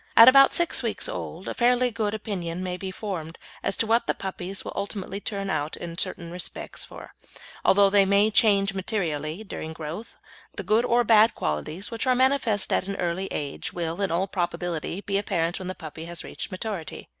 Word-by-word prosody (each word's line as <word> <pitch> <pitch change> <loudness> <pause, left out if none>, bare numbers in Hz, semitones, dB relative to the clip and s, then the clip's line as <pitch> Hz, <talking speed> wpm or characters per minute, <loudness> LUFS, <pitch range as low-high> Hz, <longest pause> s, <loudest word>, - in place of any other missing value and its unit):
At 230 - +11
about 275 +1 +8
six 345 -1 +3
weeks - - -1
old - - -6
a - - -2
fairly 250 0 +3
good 215 -2 -1
opinion 185 -5 -4
may 180 -1 -2
be 190 +1 -5
formed 185 -5 -5 0.2
as 195 - -1
to - - +2
what 230 +2 +2
the - - +1
puppies 190 0 -4
will - - -5
ultimately 200 -1 -4
turn 200 -1 -3
out 150 0 -2
in 170 -1 -6
certain 170 -1 -2
respects, 180 0 -5
for, - - -11 0.5
although 200 0 +5
they 200 -1 +6
may 200 +2 +3
change 200 -3 +4
materially 175 -3 -2
during 160 -6 -6
growth, 160 +7 -7 0.4
the - - -4
good 225 +3 +3
or 240 0 +3
bad 225 0 +5
qualities 155 - -3
which 230 +2 -3
are 255 - +4
manifest 255 -5 +2
at - - +1
that 195 0 -4
early 180 +2 -1
age 145 -2 -4
will, 170 +1 -3
in 195 - +1
all 175 +3 +1
probability, 175 -1 -3
be 200 -1 0
apparent 175 -4 -1
when 185 - -6
the 185 - -4
puppy 160 +1 -8
has 170 0 -5
reached - - -6
maturity. 185 -3 -5
195 Hz, 195 wpm, -26 LUFS, 170-220 Hz, 0.5 s, At